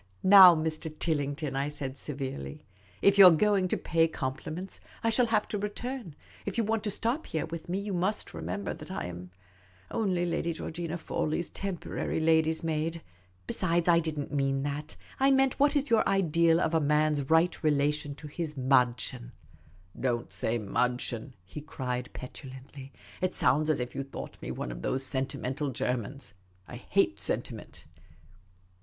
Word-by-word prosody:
" - - -34
Now, 185 -2 +10
Mr. 160 0 -2
TilHngton," 145 -2 -2
I 140 +2 0
said 140 -3 -5
severely, 130 - -6 0.2
" - - -29
if 200 0 +5
you 195 - +12
're 165 -3 +6
going 200 -1 +3
to - - 0
pay 165 0 +2
compliments, 155 +6 -5 0.2
I 230 - +2
shall 240 +2 +3
have 220 -2 +1
to 210 - -2
return. 210 - -5 0.3
If 200 - -4
you 230 - +2
want 220 0 -1
to - - +1
stop 235 +9 0
here 160 - -2
with 165 +1 -8
me, 180 - 0
you 200 0 -3
must 185 +4 -1
remember 90 +5 -4
that - - -11
I - - -4
am 90 +1 -7 0.6
only 185 -6 0
Lady 170 0 -1
Georgina 165 +1 -5
Fawley's 160 0 -2
temporary 195 -4 -3
lady's 160 0 +2
maid. 160 +1 -2 0.4
Besides, 170 - 0
I 170 -1 +6
did 160 -2 -3
n't 145 - -5
mean 135 -1 0
that. 145 +2 -4 0.2
I 270 +1 +4
meant, 270 -1 +3
what 285 +1 +4
is 285 -3 0
your 225 - +4
ideal 170 -3 +3
of 165 -2 0
a 160 - +4
man's 150 -1 +1
right 165 +2 +3
relation 145 -1 +1
to 150 - -10
his 155 0 -5
viddchen? 125 -2 +1 0.2
' 80 -1 -26
* 90 - -27
" 90 - -18
Don't 120 -2 -1
say 115 +1 0
madchen,'" 125 +3 -1
he 95 +11 -8
cried, 125 -4 -4
petulantly. 130 +1 -10 0.2
" - - -20
It 185 0 0
sounds 145 +5 +2
as 155 - +2
if 125 0 -4
you - - -3
thought 135 0 -8
me - - -6
one 60 - -4
of - - -7
those 135 +1 -1
sentimental 135 +2 -2
Germans. 125 - -3 0.3
I - - -8
hate - - 0
sentiment." - - -4
155 Hz, 180 wpm, -29 LUFS, 135-180 Hz, 0.6 s, you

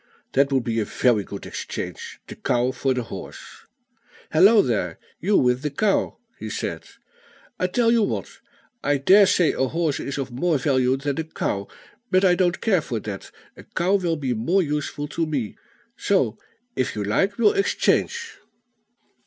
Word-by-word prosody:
"That 140 +1 +2
would 135 -2 +2
be 115 -1 -1
a 105 - 0
very 115 -1 +2
good 100 0 -8
exchange: - - -6
the - - -9
cow 125 +1 0
for 130 +1 -1
the 125 - -1
horse. - - -10 0.6
Hallo 200 +7 +6
there! 95 -9 -1 0.2
you 200 +4 +2
with 125 0 +2
the 150 - -1
cow," 195 +8 0 0.2
he 110 - -5
said. - - -4 0.7
"I 185 - +1
tell 230 +5 +2
you 230 -1 +4
what; 205 - -3 0.4
I 145 0 +2
dare 195 +9 +6
say 175 -3 +3
a 130 - 0
horse 160 0 -1
is 140 - -4
of 135 -2 -4
more 155 +6 +1
value 130 -1 +2
than 140 +2 -3
a - - 0
cow; 100 -10 -3 0.4
but 185 +1 +3
I 180 - +5
don't 175 0 +1
care 195 -7 +2
for 120 -6 -4
that, 100 -2 -7 0.3
a - - -12
cow 180 +3 -1
will 180 -4 +1
be 135 -5 -2
more 170 - +1
useful 145 -1 -3
to 165 0 -1
me; 135 -9 -3 0.4
so, 135 - +1 0.4
if 130 - -1
you 105 - -2
like, 195 - 0
we'll 245 - +4
exchange." 400 -1 0
145 Hz, 175 wpm, -23 LUFS, 125-180 Hz, 0.7 s, Hallo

